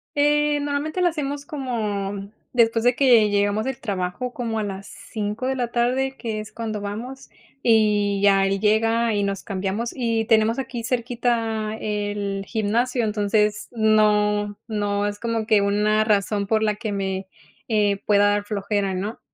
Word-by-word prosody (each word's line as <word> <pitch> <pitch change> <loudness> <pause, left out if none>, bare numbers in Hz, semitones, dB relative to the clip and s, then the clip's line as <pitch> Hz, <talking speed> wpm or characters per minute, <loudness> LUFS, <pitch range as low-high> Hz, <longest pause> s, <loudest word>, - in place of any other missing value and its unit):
Eh, 295 0 +3
normalmente 290 +4 -2
lo 360 - +4
hacemos 285 -3 -4
como, 205 -8 -3 0.2
después 230 -1 +3
de 245 - +4
que 235 -6 +5
llegamos 205 +1 +1
del 265 -2 -3
trabajo 200 +3 -3
como 230 -3 -3
a 215 - 0
las 195 -1 -5
5 210 +3 -5
de 265 - 0
la 245 -2 -1
tarde, 255 +3 0
que 220 -4 -4
es 215 - -9
cuando 220 -2 -4
vamos 230 +7 -7 0.3
y 210 -3 +3
ya 195 -1 +5
él 195 0 0
llega 225 +2 +2
y 205 - +1
nos 200 -1 -2
cambiamos 200 +4 -3
y 230 -3 0
tenemos 220 +1 +3
aquí 245 -2 -4
cerquita 230 -3 -1
el 205 -2 -2
gimnasio. 235 +3 0
Entonces 210 0 0
no, 210 -2 +2
no 205 -2 -1
es 205 0 -4
como 230 -2 -2
que 215 -2 +4
una 210 +2 +2
razón 205 -1 +1
por 220 +1 +1
la 210 -1 +2
que 215 -1 -4
me, 190 -1 -2 0.4
eh, 205 -3 +2
pueda 205 0 +4
dar 205 0 0
flojera, 200 -1 -1
¿no? 200 +5 -4
215 Hz, 160 wpm, -23 LUFS, 205-235 Hz, 0.4 s, que